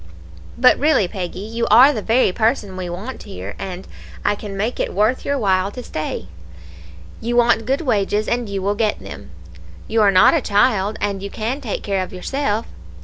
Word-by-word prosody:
"'But 255 +1 +5
really, 285 - +3
Peggy, 180 0 -5
you 230 +3 -3
are 255 +7 +7
the 220 - -3
very 230 -1 +2
person 210 -2 0
we 185 -1 -5
want 205 +9 -6
here, 95 +2 -8
and 185 -1 -6 0.4
I - - +3
can 205 -1 -7
make 220 +5 -2
it - - -2
worth 215 +6 +1
your 280 0 -1
while 190 -4 +1
to 250 - -7
stay. 155 - -5 0.9
You 240 +1 -2
want 235 -2 +3
good 270 +4 +1
wages, 210 -6 0
and 235 -2 -1
you 195 -1 -3
will 200 +1 +1
get 210 0 0
them; - - -10 0.6
you 225 0 +1
are 205 - +5
not 185 -2 +6
a 325 - +2
child, 205 -1 +2
and 200 -2 -2
you 200 - -5
can 235 +8 -3
take 230 -7 -4
care 195 -2 -1
of - - -9
yourself. 220 +3 -2
210 Hz, 195 wpm, -20 LUFS, 195-240 Hz, 0.9 s, are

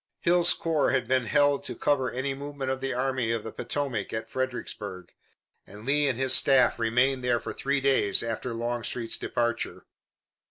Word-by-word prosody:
Hill's 175 0 +4
corps 160 -3 +1
had 130 -3 0
been 130 -1 +1
held 145 +2 +2
to - - -5
cover 135 -3 +1
any 130 +2 -2
movement 140 -1 -5
of 130 0 -3
the 135 0 -2
Army 130 -2 -1
of 115 -2 -2
the 110 - -6
Potomac 120 -3 -3
at 110 0 -5
Fredericksburg, 105 -8 -5 0.5
and 105 +3 -11
Lee 145 +2 +2
and 130 -3 0
his 130 0 +2
staff 135 -2 +5
remained 125 +3 +1
there 120 -1 +2
for - - -6
three 140 +1 -1
days 130 -8 +3
after 115 +2 -3
Longstreet's 120 0 -3
departure. 120 0 -2
130 Hz, 170 wpm, -27 LUFS, 115-140 Hz, 0.5 s, staff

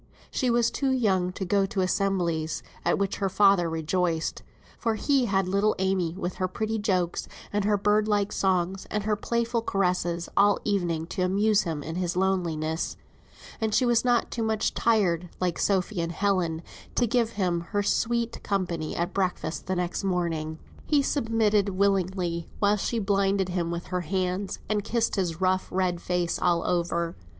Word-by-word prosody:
She 255 - 0
was 235 -1 +3
too 275 - 0
young 195 -8 +2
to 190 - -4
go 195 +2 +2
to 195 0 -1
assemblies, 180 -4 0 0.2
at - - +2
which 200 0 -1
her 195 -1 0
father 195 -3 +4
rejoiced, 165 +1 -1 0.4
for 225 -2 0
he 270 +3 +2
had 195 -3 +1
little 200 +3 +2
Amy 185 -3 0
with 180 -2 -4
her 185 - 0
pretty 220 +4 -2
jokes, 185 -5 0 0.3
and 205 -1 +1
her 210 0 +3
bird 210 +1 +2
like 205 -1 +1
songs, 190 0 0
and 210 -1 -1
her 215 0 +1
playful 235 +2 -1
caresses 180 -4 0
all 205 +1 +5
the 210 - -3
evening 170 -5 0
to 180 - -4
amuse 200 +3 +3
him 160 -4 -3
in 160 +3 -5
his 180 -1 -1
loneliness; 170 -4 -1 0.6
and 220 -1 +1
she 255 - +3
was 240 -1 +3
not 245 -1 +2
too 235 - -3
much 220 -1 0
tired, 180 -7 +2
like 180 -2 -1
Sophy 190 -1 +1
and 165 0 -3
Helen, 180 -4 0 0.3
to 245 - +3
give 230 -1 +1
him 180 -4 0
her 205 -1 0
sweet 235 +2 0
company 175 -5 -2
at 175 +2 -2
breakfast 180 -4 -2
the 185 - 0
next 180 +2 -2
morning. 165 -4 -1 0.3
He 290 -2 +3
submitted 225 -7 +2
willingly 185 -3 0
while 205 0 +3
she 230 +3 -1
blinded 195 -2 +1
him 175 -2 -1
with 170 0 -4
her 180 - +1
hands, 185 +2 -2
and 210 -1 0
kissed 230 +1 0
his 175 -5 -1
rough 185 0 +2
red 180 -2 0
face 180 -1 -1
all 170 -2 +2
over. 170 -1 0
190 Hz, 175 wpm, -27 LUFS, 175-210 Hz, 0.6 s, all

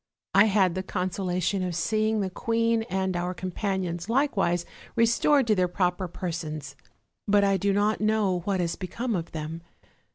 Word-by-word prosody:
I 195 +2 +7
had 195 -4 +3
the 185 - -2
conso 185 0 -3
lation 185 +2 0
of 180 -2 -2
seeing 215 +5 +1
the 190 -1 -2
queen 230 +2 +1
and 190 0 -1
our 180 +1 -2
companions 185 0 -3
likewise 200 - +1 0.3
restored 235 +4 +4
to 220 - +3
their 185 -3 +2
proper 180 0 0
persons; 160 -4 -5 0.5
but 205 0 +4
I 195 -1 +3
do 200 +2 +1
not 205 +2 +1
know 215 -4 +2
what 190 +2 -1
has 170 -1 -1
become 225 +5 -3
of 170 -2 -4
them. 160 +1 -5
190 Hz, 165 wpm, -27 LUFS, 175-215 Hz, 0.5 s, I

